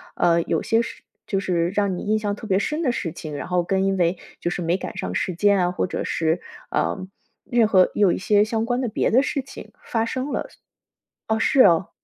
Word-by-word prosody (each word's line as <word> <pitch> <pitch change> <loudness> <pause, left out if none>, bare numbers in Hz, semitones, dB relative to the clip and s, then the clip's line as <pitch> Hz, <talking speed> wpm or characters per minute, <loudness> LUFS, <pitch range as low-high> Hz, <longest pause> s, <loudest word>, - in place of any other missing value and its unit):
呃， 170 -1 +3
有 - - -1
些 225 - +2
事 - - -9 0.2
就 195 - -1
是 175 -3 0
让 200 -3 0
你 - - -5
印 215 +1 +1
象 205 -1 -2
特 220 - -10
别 195 -1 +2
深 305 +9 -2
的 255 - +2
事 170 -8 -3
情， 155 -3 -7
然 - - -5
后 180 -1 +1
更 190 +2 0
因 195 0 +1
为 175 0 +1 0.2
就 175 - -2
是 175 - -3
没 170 +2 +1
赶 - - -7
上 - - -4
时 185 - -1
间 200 +2 +3
啊， 180 0 +1
或 185 - -1
者 - - -3
是 165 +1 0 0.3
啊， - - 0 0.5
任 235 -3 +4
何 185 -3 +5
有 200 -4 +4
一 - - -1
些 205 +2 +3
相 220 0 -1
关 245 0 0
的 250 - -1
别 215 - 0
的 255 +5 +4
事 285 -1 -1
情 275 - -11
发 225 -1 -1
生 260 +4 -3
了。 - - -2 0.8
哦， 220 0 +1
是 260 +3 +4
哦。 175 -3 +5
200 Hz, 255 characters per minute, -23 LUFS, 180-225 Hz, 0.8 s, 何